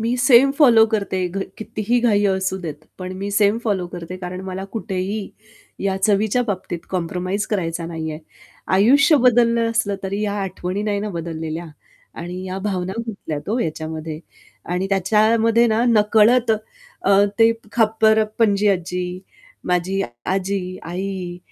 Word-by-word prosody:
मी 235 +3 0
same 260 +1 +6
follow 235 -7 +7
करते, 190 -3 0
घ 195 +3 -4 0.2
कितीही 220 +2 -1
घाई 210 -4 +3
असू 190 0 0
देत 155 -4 -7
पण 185 0 -5
मी 200 +1 -4
सेम 205 +2 +3
फॉलो 195 -5 0
करते, 175 +1 -7
कारण 180 0 -6
मला 190 +1 -5
कुठेही 200 -1 -3 0.5
या 190 -1 +1
चवीच्या 215 +4 +2
बाबतीत 185 -4 -3
कॉम्प्रोमाईज 185 +3 -2
करायचा 170 -5 -2
नाहीये. 160 -2 -5 0.5
आयुष्य 275 - +5
बदललं 235 -2 +3
असलं 220 -3 0
तरी 195 +2 -3
या 205 -1 -1
आठवणी 185 +1 -4
नाही 205 -1 -1
ना 210 - -3
बदललेल्या 165 -1 -5 0.5
आणि 180 +2 -6
या 185 +1 -4
भावना 185 -1 -2
गुंतल्यात 160 -7 -6
हो 235 - 0
याच्यामध्ये. 160 -3 -4 0.5
आणि 180 +2 -2
त्याच्यामध्ये 220 +4 +3
ना 230 +1 +2
नकळत 225 +2 +4 0.5
अ, 200 +1 +5
ते 225 0 +6 0.2
खापरपणजी 220 -2 +2
आज्जी, 180 -1 -2 0.5
माझी 180 +2 0
अ, - - -3 0.2
आजी, 190 -1 -2
आई 180 0 -5
195 Hz, 140 wpm, -21 LUFS, 180-220 Hz, 0.5 s, फॉलो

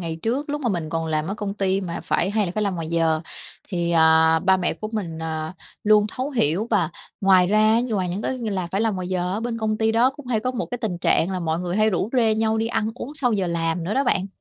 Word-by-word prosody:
Ngày 165 -2 -4
trước 270 +6 -1
lúc 295 +1 -2
mà 245 - 0
mình 170 -6 -2
còn 165 -1 -2
làm 155 0 -1
ở 200 - -2
công 205 -1 -4
ty 195 -1 0
mà 170 -3 -4
phải 195 - +1
hay 210 -2 +1
là 175 - -4
phải 215 - 0
làm 200 -3 0
ngoài 165 -2 -4
giờ 165 -1 +1 0.5
thì, 170 -3 -1
à, 160 0 +5
ba 190 +2 +3
mẹ 180 - -1
của 215 - -6
mình, 170 -7 -4
à, 160 +1 -4 0.3
luôn 210 0 +5
thấu 260 +6 -4
hiểu. 200 - +1
Và 175 -7 +2 0.3
ngoài 190 -2 +5
ra 215 +3 +4
như 245 -3 -2
ngoài 185 -3 0
những 190 +4 -3
cái 260 - -2
như 225 -3 -3
là 185 -3 -2
phải 195 +4 -2
làm 225 -2 +1
ngoài 185 -1 -4
giờ 185 -1 -1
ở 210 - -2
bên 230 -1 -3
công 215 -1 -1
ty 220 0 +2
đó 240 +3 +4
cũng 290 -2 -13
hay 225 -4 0
có 255 - -1
một 245 -1 -4
tình 180 -6 -2
trạng 175 +1 +2
là 185 -1 -2
mọi 160 0 -1
người 180 +1 -2
hay 215 0 +3
rủ 190 +4 -1
rê 225 -4 +3
nhau 220 0 +1
đi 225 - 0
ăn 225 -1 -1
uống 270 +3 -7
sau 250 -5 0
giờ 195 -3 0
làm 165 0 -1
nữa 205 - -2
đó 275 +1 +2
bạn. 195 -5 +1
195 Hz, 285 wpm, -23 LUFS, 170-225 Hz, 0.5 s, à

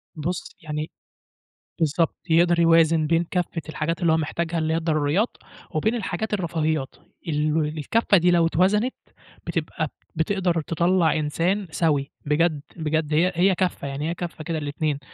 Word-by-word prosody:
بُص، 170 +4 -4
يعني 155 0 -4 0.9
بالضبط. 160 +1 +1
يقدر 170 +1 +4
يوازن 165 -2 +4
بين 165 +1 +2
كفّة 175 -2 -1
الحاجات 160 +3 -2
اللي 170 -2 +3
هو - - +3
محتاجها، 165 +2 -2
اللي 160 0 0
هي - - +2
الضروريات، 160 +5 0 0.3
وبين 220 +10 0
الحاجات 215 0 -3
الرفاهيات. 160 -6 -1 0.3
ال 150 -1 0
ول 150 -2 +2
الكفّة 175 +7 +2
دي 175 +1 +4
لو 170 -1 +4
اتوزنت، 200 +9 +2 0.5
بتبقى - - -2 0.3
بتقدر 175 0 +1
تطلّع 170 +1 +2
إنسان 170 +6 0
سوي. 145 -5 +1
بجد، 150 0 +2
بجد 155 -1 -1
هي 175 +4 +3
هي 185 +2 +4
كفّة، 180 -6 -1
يعني 145 +4 -3
هي - - -1
كفّة 170 -2 -6
كده 165 -1 -2
للاتنين، 145 0 -2
165 Hz, 150 wpm, -24 LUFS, 155-175 Hz, 0.9 s, يقدر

